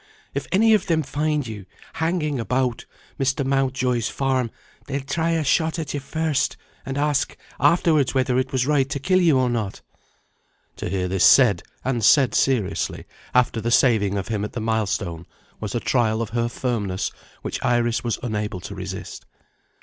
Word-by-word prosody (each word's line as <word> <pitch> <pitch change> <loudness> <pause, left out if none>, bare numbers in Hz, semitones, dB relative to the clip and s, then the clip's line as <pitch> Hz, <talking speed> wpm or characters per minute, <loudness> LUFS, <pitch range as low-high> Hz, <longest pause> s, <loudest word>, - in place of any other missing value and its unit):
If 140 -2 -3
any 220 +4 +5
of 205 -3 +2
them 160 -3 +2
find 150 +1 -1
you 105 -4 -8 0.3
hanging 160 -4 -1
about 125 0 -1 0.3
Mr. 135 0 +1
Mountjoy's 130 -3 0
farm, 130 -3 0 0.4
they'll 140 0 -2
try 165 +4 0
a 165 -1 +1
shot 160 +4 +1
at 160 -2 -4
you 145 - -2
first, 150 -1 -1 0.3
and 135 +1 -3
ask 145 -1 0 0.2
afterwards 145 -2 +3
whether 130 -1 +2
it 130 0 -2
was 130 -2 +1
right 140 -2 +2
to 140 - -2
kill 185 +6 +2
you 165 -6 +4
or 130 -1 +2
not." 110 -5 -2 1.0
To - - -4
hear 90 0 -1
this 95 0 0
said 115 -10 +6 0.2
and 125 -3 0
said 130 0 +5
seriously 125 -8 0 0.3
after 125 -2 +3
the 115 - -1
saving 110 -5 +3
of 95 - -4
him 105 -2 -1
at 105 - -5
the 120 - -3
milestone, 100 -6 -2 0.3
was 105 -1 -4
a - - +1
trial 115 -3 +1
of 110 - -7
her 120 0 0
firmness 105 -6 -2 0.3
which - - -4
Iris 120 -1 +1
was 120 -3 -1
unable 105 -5 -2
to 100 - -7
resist. 95 0 -7
125 Hz, 175 wpm, -23 LUFS, 110-140 Hz, 1.0 s, said